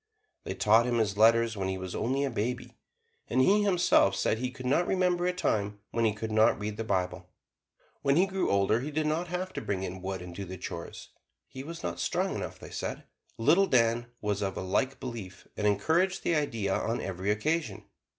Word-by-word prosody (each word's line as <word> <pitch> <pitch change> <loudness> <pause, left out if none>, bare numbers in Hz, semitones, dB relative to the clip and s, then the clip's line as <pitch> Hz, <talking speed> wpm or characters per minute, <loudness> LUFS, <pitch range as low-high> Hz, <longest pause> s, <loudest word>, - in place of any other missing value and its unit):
They - - -4
taught 110 +3 +4
him 120 -1 +1
his 105 -3 +1
letters 115 +1 +4
when 95 -2 -2
he 95 0 -2
was 95 -1 -6
only 135 +4 0
a 140 - -1
baby, 120 +2 -3 0.5
and - - 0
he 200 +11 +5
himself 180 - +4
said 110 - +1
that - - -7
he 125 - -1
could 130 0 -10
not 145 +7 +2
remember 180 -1 +1
a - - +3
time 105 - -1
when 115 0 +1
he 110 - +3
could 110 0 -4
not 110 +1 +4
read 105 0 -4
the 115 - -2
Bible. 90 -3 -2 0.7
When 140 0 +2
he 180 +4 +5
grew 190 0 -1
older 100 +3 +3
he 135 +5 -4
did 155 +1 -1
not 160 +3 0
have 180 +2 -4
to - - -4
bring 95 -2 -2
in 95 0 -5
wood 95 -1 -4
and 90 -1 -9
do 100 - -6
the 95 0 -7
chores 85 -1 -7 0.4
he 130 - -8
was 165 +3 -8
not 85 -1 -3
strong - - 0
enough, - - -5
they - - -11
said. - - -4 0.3
Little 175 +12 +4
Dan 120 -3 +2
was 105 -1 -1
of 95 -1 -2
a - - -2
like 130 +9 0
belief, 95 -7 -7
and 105 - 0
encouraged 160 - +1
the - - +1
idea 115 -10 0
on 115 +1 -1
every 95 +1 -3
occasion. 120 +1 -1
115 Hz, 220 wpm, -29 LUFS, 100-145 Hz, 0.7 s, he